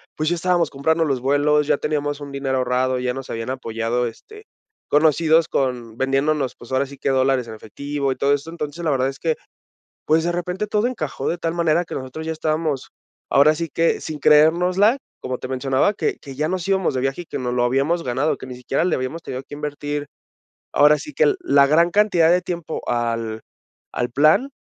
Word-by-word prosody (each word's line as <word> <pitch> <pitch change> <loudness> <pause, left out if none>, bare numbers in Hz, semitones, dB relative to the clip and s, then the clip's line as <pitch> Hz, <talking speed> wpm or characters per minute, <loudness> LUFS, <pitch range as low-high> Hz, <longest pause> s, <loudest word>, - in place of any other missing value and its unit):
pues, 155 0 0
ya 175 - +1
estábamos 175 -2 +1
comprando 160 +4 +1
los 140 -5 0
vuelos, 145 +3 +2
ya - - +3
teníamos 145 -1 -2
un 140 - -7
dinero 135 -1 -1
ahorrado, 125 0 0
ya 125 0 -1
nos 135 0 -7
habían 115 +2 -4
apoyado, 120 -1 -2
este, 425 - -12 0.4
conocidos 160 +2 +3
con 125 -5 -2
vendiéndonos, 135 +1 0
pues, 120 - -14
ahora 130 +1 +1
sí 140 0 -12
que - - -1
dólares 130 -2 +2
en 110 - -7
efectivo 140 +6 -4
y - - -2
todo 140 +2 +1
esto. 145 +3 -3
Entonces, 165 0 -6
la 155 - +2
verdad 130 -1 +1
es 135 - -8
que, 160 +2 0 0.7
pues, 160 +1 +2
de 175 - 0
repente, 180 +4 -3
todo 210 +3 +1
encajó 155 - -3
de 175 - -1
tal 165 -1 -2
manera 170 0 +1
que - - -7
nosotros 130 +5 -6
ya 160 - -2
estábamos, 155 -3 -2 0.4
ahora 150 +3 +5
sí 165 0 -4
que 165 0 +1
sin 155 -1 -6
creérnosla, 180 - +4 0.2
como 130 -1 -3
te - - -7
mencionaba, 130 +7 +1
que - - -2
que 135 -2 -10
ya 155 +3 -1
nos 185 -1 -2
íbamos 190 -5 +1
de 130 - -1
viaje 135 +6 -1
y - - -11
que 145 - -5
no 125 -1 -2
lo 125 -1 +1
habíamos 140 +8 +1
ganado, 130 +5 0
que - - -9
ni 125 - -8
siquiera 135 +5 -1
le 180 - +1
habíamos 130 +6 -4
tenido 130 - -5
que 140 - -13
invertir, 145 0 -4 0.6
ahora 150 +1 +5
sí 300 - -9
que 455 -3 +4
la 345 - +4
gran 165 +4 +4
cantidad 180 -4 +3
de 180 +1 +4
tiempo 170 -3 -5
al 115 -2 -2 0.5
al 120 0 -2
plan, 155 - +4
145 Hz, 210 wpm, -21 LUFS, 130-165 Hz, 0.7 s, ahora